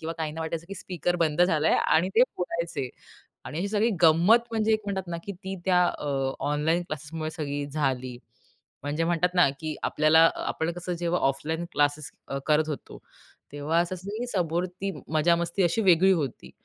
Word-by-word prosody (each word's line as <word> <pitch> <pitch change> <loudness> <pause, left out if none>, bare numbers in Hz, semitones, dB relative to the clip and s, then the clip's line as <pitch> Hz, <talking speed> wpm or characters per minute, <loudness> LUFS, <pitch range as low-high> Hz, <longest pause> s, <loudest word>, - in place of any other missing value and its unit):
किंवा 165 +1 -4
काहींना 160 0 -3
वाटायचं 160 +1 -4
की 195 - -6
स्पीकर 175 -1 -2
बंद 165 0 +2
झालंय 160 -3 +3
आणि 175 +4 +3
ते 235 - +7
बोलायचे 170 -6 -3 0.6
आणि 150 - -6
अशी 195 +3 -1
सगळी 215 +2 +2
गंमत 175 +9 +5
म्हणजे 220 -1 +1
एक 215 - +2
म्हणतात 190 -2 -3
ना 170 - -2
की 200 - -5
ती 190 +1 -7
त्या 180 -1 +4
अ, 150 - -4 0.4
ऑनलाईन 160 +4 +1
क्लासेसमुळे 155 0 -5
सगळी 145 -3 -4
झाली. 135 -4 -2 0.7
म्हणजे 150 +3 -1
म्हणतात 175 +1 +1
ना, 175 -5 +5
की 155 -1 -3
आपल्याला 160 +2 +5
आपण 160 +1 -2
कसं 175 0 -4
जेव्हा 175 +1 0
ऑफलाईन 160 +5 -3
क्लासेस 145 0 0 0.2
अ, 140 - -3
करत 155 0 +3
होतो, 150 - -6 0.5
तेव्हा 145 +3 0
असं 175 +2 -1 0.4
समोर 175 -2 0
ती 185 +2 -5 0.2
मजा-मस्ती 170 +4 +2
अशी 175 +5 +2
वेगळी 185 0 +5
होती 145 -8 -3
165 Hz, 170 wpm, -26 LUFS, 155-180 Hz, 0.7 s, ते